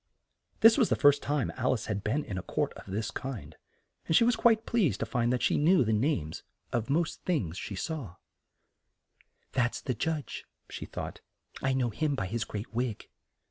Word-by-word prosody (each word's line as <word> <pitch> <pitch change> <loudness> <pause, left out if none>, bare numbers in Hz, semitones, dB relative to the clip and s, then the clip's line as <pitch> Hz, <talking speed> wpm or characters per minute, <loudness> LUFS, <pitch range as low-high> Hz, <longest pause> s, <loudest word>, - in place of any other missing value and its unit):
This 225 +4 +8
was 235 - +4
the - - +3
first 145 -1 +5
time 145 -2 0
Al 130 0 +2
ice 115 - -3
had 105 -2 -3
been 135 +8 0
in 100 - -5
a 95 - -2
court - - -1
of - - -12
this 105 +3 -2
kind, 130 -5 -6 0.5
and 160 - +2
she - - +7
was 240 0 +4
quite 225 -1 +4
pleased 215 - +1
to - - +1
find 120 -1 0
that 125 -2 0
she - - +3
knew 170 +2 +5
the 110 - +1
names 105 - 0 0.3
of 120 +1 -1
most 160 +3 0
things 110 - -1
she 100 - -5
saw 130 - -4 1.0
there. - - -29 0.3
"That's 125 -2 +1
the 130 - -2
judge," 155 +5 -3 0.3
she - - -6
thought, - - -6 0.4
"I 135 0 +1
know 125 -3 +1
him 150 +5 0
by 115 - -2
his 115 +4 -2
great 105 +2 -6
wig." 120 -2 -2
130 Hz, 200 wpm, -30 LUFS, 110-155 Hz, 1.0 s, This